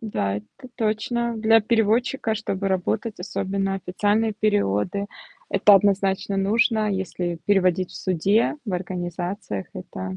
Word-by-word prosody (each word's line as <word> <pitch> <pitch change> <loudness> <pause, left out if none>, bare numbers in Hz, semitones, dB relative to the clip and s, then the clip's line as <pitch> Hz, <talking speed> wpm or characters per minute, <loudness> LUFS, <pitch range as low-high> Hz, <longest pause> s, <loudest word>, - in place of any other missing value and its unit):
Да, 100 - -2
это 105 - -11
точно. 235 +1 -1
Для 225 +1 +5
переводчика 225 +2 +1
чтобы 200 -2 -2
работать, 200 +3 -1
особенно 195 +1 -2
официальные 205 +4 0
переводы- 200 - 0 0.4
это 205 - +6
однозначно 195 0 +2
нужно, 215 +2 +2
если 180 -3 -3
переводить 185 -2 +2
в - - -10
суде, 195 - +1
в 210 - -4
организациях. 175 - -4
Это 95 0 -6
200 Hz, 120 wpm, -23 LUFS, 180-220 Hz, 0.4 s, это